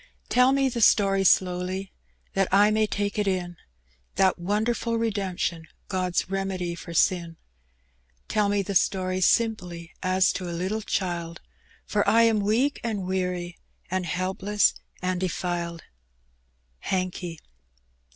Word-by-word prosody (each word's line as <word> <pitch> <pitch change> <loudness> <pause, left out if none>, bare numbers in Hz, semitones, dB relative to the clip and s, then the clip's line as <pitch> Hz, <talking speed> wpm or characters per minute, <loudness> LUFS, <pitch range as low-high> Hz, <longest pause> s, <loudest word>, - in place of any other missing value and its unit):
Tell 250 +1 +5
me 275 0 +2
the 240 -2 -2
story 195 -2 +4
slowly, 185 +1 +1 0.4
That 195 -1 +2
I 205 +2 +5
may 215 0 +2
take 205 0 -2
it 205 - 0
in; 180 -2 -1 0.6
That 190 -2 +3
wonderful 220 +5 0
redemption, 190 -7 -2 0.2
God's 185 -2 0
remedy 190 -2 -2
for 170 0 -9
sin. 170 -1 +1 0.9
Tell 210 -2 +1
me 205 -1 +1
the 200 - -4
story 185 0 +1
simply, 180 -6 +1
As 185 0 +2
to 180 -2 -4
a 170 - -4
little 200 +5 -2
child; 170 -5 -3 0.5
For 205 -1 +1
I 230 +1 +5
am 225 -2 +3
weak 225 +8 +1
and 215 -5 -2
weary, 180 -2 -2 0.3
And 185 -1 -1
helpless 190 +4 +1 0.3
and 185 0 0
defiled. 175 -2 -3 1.0
Hankey. 180 - -3
190 Hz, 130 wpm, -26 LUFS, 180-210 Hz, 1.0 s, Tell